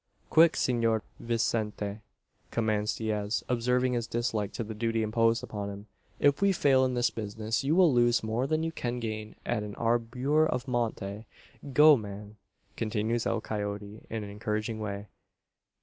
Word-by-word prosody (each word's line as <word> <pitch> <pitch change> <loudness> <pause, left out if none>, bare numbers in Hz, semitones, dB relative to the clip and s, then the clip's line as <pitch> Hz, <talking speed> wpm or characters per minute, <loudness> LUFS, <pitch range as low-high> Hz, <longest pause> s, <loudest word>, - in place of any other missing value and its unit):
"Quick. 165 0 +6
Senor 115 -3 +1 0.2
Vicente!" 110 -3 -1 0.5
commands 110 -2 0
Diaz, 110 -1 -1
observing 125 +1 +1
his 120 -2 -1
dislike 115 -4 -1
to - - -3
the 110 0 -6
duty 115 +1 0
imposed 115 +2 +2
upon 105 -4 -4
him; 100 +1 -8 0.3
"if 145 +3 +3
we 200 0 +5
fail 135 -6 +4
in 130 -1 0
this 120 -2 +2
business, 110 +3 -3
you 145 +4 +2
will 175 -6 +5
lose 120 -1 +3
more 115 +4 -1
than 155 +2 0
you 165 - -1
can 125 -5 -3
gain 110 -2 -5
at 120 -3 0
an 105 -1 -6
albur 125 +7 +1
of 125 -2 -2
monte. 110 -4 -2 0.4
Go, 150 +3 +8
man!" 105 0 -8 0.4
continues 110 +1 -1
El 115 - 0
Coyote, 105 0 -4
in 110 -1 -3
an 100 - -7
encouraging 105 +1 -3
way. 100 -1 -4
115 Hz, 160 wpm, -29 LUFS, 105-125 Hz, 0.5 s, Go